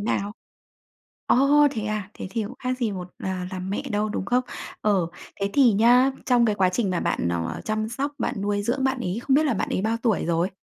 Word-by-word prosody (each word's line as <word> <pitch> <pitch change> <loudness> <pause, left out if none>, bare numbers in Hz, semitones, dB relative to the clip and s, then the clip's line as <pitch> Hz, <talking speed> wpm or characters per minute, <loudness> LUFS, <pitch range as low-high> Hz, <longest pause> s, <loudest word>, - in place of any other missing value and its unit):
nào? 205 -1 -1 0.9
Ồ, 290 +3 +5
thế 220 -6 -4
à? 215 -2 -3
Thế - - -6
thì 225 0 -1
cũng 225 +5 -7
khác 255 0 -2
gì 225 -5 0
một 180 -1 -6 0.2
ờ, 190 - -1 0.2
làm 185 0 -4
mẹ 200 - -2
đâu, 210 +1 0
đúng 205 - -3
không? 250 +4 +1 0.4
Ờ, 195 -5 +2 0.3
thế 200 0 0
thì 265 -5 +5
nhá, 245 +6 +5 0.2
trong 245 -2 +4
cái 215 - +2
quá 190 -2 +3
trình 195 +2 0
mà 180 - 0
bạn, 85 - 0
ờ, 85 -1 -3
chăm 215 0 -1
sóc, 275 +5 -3
bạn - - -1
nuôi 205 0 0
dưỡng 245 +5 -1
bạn 265 0 +1
ấy, 185 -1 -2
không 265 - +2
biết 310 - +3
là 280 -6 +1
bạn - - -2
ấy - - -1
bao 225 +2 +1
tuổi 225 -5 +1
rồi? 170 +1 +1
215 Hz, 235 wpm, -24 LUFS, 195-250 Hz, 0.9 s, Ồ